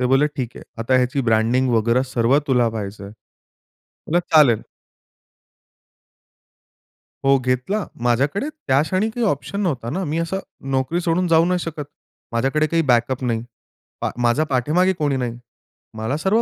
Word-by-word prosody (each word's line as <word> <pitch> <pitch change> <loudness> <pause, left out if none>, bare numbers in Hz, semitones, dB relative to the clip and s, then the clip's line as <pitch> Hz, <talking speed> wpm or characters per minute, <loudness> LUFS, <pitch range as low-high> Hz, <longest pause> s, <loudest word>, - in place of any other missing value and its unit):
ते 125 - +2
बोलले, 135 +3 +4
"ठीक 130 -5 -5
आहे. - - -9 0.2
आता 125 +3 +1
ह्याची 130 +2 +1
ब्रँडिंग 115 +3 +2
वगैरे 115 +2 +2
सर्व 120 +4 +3
तुला 125 -3 +3
पाहायचंय." 100 -2 -6 0.8
म्हणलं, 170 +3 -2 0.2
"चालेल." 135 -8 +6 2.6
हो 135 0 +5
घेतला. 130 - -1 0.2
माझ्याकडे 140 - +1
त्या 140 - 0
क्षणी 190 +7 0
काही 235 +1 -2
ऑप्शन 200 +4 -2
नव्हता 130 - -2
ना. 190 +9 -2
मी 155 -1 -2
असं 170 +3 -2 0.3
नोकरी 135 +6 0
सोडून 175 +1 +1
जाऊ 165 0 +4
नाही 180 0 +1
शकत. 160 -3 -5 0.5
माझ्याकडे 135 +6 +1
काही 165 +2 +1
बॅकअप 125 -1 +1
नाही. 115 -2 -1 0.6
पा - - 0
माझ्या 120 +6 +2
पाठीमागे 155 +8 +2
कोणी 145 -5 -1
नाही. 120 -2 -3 0.6
मला 110 +7 -2
सर्व 195 +8 +2
135 Hz, 145 wpm, -21 LUFS, 120-165 Hz, 2.6 s, चालेल